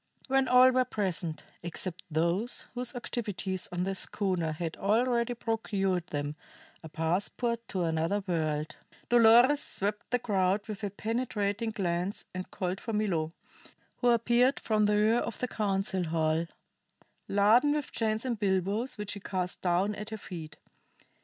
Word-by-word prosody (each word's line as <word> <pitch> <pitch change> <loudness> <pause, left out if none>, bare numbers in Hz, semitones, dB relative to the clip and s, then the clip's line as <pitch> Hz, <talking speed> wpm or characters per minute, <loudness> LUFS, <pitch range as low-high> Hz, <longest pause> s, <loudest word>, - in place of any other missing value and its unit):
When 270 -1 +3
all 255 +1 +7
were 255 0 +3
present, 190 -9 -2 0.2
except 175 +1 -4
those 170 +9 0
whose 250 +1 -1
activities 205 -6 -3
on 180 0 -1
the 195 +1 -1
schooner 185 -4 -1
had 165 +1 -4
already 235 +3 +1
procured 195 -6 -1
them 145 -1 -3 0.5
a 160 - -9
passport 200 +9 -1
to 185 -2 -2
another 165 +5 0
world, 155 -4 -1 0.3
Dolores 240 +5 +6
swept 205 +2 -3
the 245 - +2
crowd 200 -3 0
with 215 -1 -6
a 205 - 0
penetrating 220 0 -2
glance 185 -2 -2
and 185 0 -5
called 185 +1 -3
for 225 - -4
Milo, 170 -7 0 0.6
who 245 - +2
appeared 240 +3 +3
from 215 -1 +2
the 210 - +3
rear 220 +3 +4
of - - -4
the 250 - -2
council 195 -4 -1
hall 160 0 +1 0.8
laden 220 +9 +4
with 295 -2 -2
chains 220 +1 -1
and 240 -4 -2
bilboes 200 +5 0
which 210 -1 -3
he 205 - -7
cast 185 -2 -3
down 185 +3 +1
at 210 +1 -6
her 220 - -5
feet. 165 -6 -8
205 Hz, 150 wpm, -30 LUFS, 180-230 Hz, 0.8 s, all